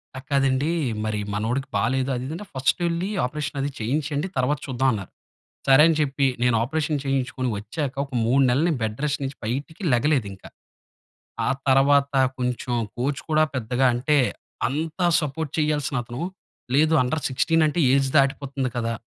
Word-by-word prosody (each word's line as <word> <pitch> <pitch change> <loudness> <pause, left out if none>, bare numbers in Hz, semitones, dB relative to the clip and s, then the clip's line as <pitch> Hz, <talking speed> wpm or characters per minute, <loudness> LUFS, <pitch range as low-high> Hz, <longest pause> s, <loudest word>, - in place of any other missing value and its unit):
అది 130 - -7
కాదండీ, 135 +1 +2 0.4
మరి 110 -1 -1
మనోడికి 120 +6 -1
బాలేదు, 130 +5 0
అది, 125 - -4
ఇది 155 - -5
అని. 210 - -8
ఫస్ట్ 130 +3 +1
వెళ్ళి 170 +3 -1 0.2
ఆపరేషన్ 145 +1 -4
అది 140 - -1
చేయించండి. 145 - -1
తర్వాత 130 +3 +1
చూద్దాం 130 0 +1
అన్నారు. 100 -4 -6 0.6
సరే 135 +2 +7
అని 165 - +3
చెప్పి 140 -1 +1 0.2
నేను 125 -2 +3
ఆపరేషన్ 150 +3 -1
చేయించుకొని 135 -1 -1
వచ్చాక, 130 +7 -4
ఒక 140 - -19
3 130 +4 +3
నెలలు 135 +6 +2
నేను 150 -6 -1
బెడ్ 110 0 -2
రెస్ట్ 150 0 -1
నుంచి 135 +1 -5
బయటికి 140 - -4
లెగలేదు 130 -2 +2
ఇంకా. 95 - -13 1.0
ఆ - - +2 0.2
తర్వాత 140 +1 +4 0.2
కొంచెం 125 0 -2 0.3
కోచ్ 135 +3 -1
కూడా 155 0 +4
పెద్దగా 125 +2 0
అంటే, 145 +5 +2 0.5
అంత 155 +5 -4 0.2
సపోర్ట్ 150 0 -3
చేయాల్సిన 150 -2 0
అతను 120 +4 -7 0.5
లేదు 155 +3 +4
అండర్ 150 +5 -1
16 165 +5 +2
అంటే 155 +3 -1
ఏజ్ 135 -1 +2
దాటిపోతుంది 135 -1 0
కదా. 115 -1 -1
135 Hz, 160 wpm, -24 LUFS, 125-150 Hz, 1.0 s, సరే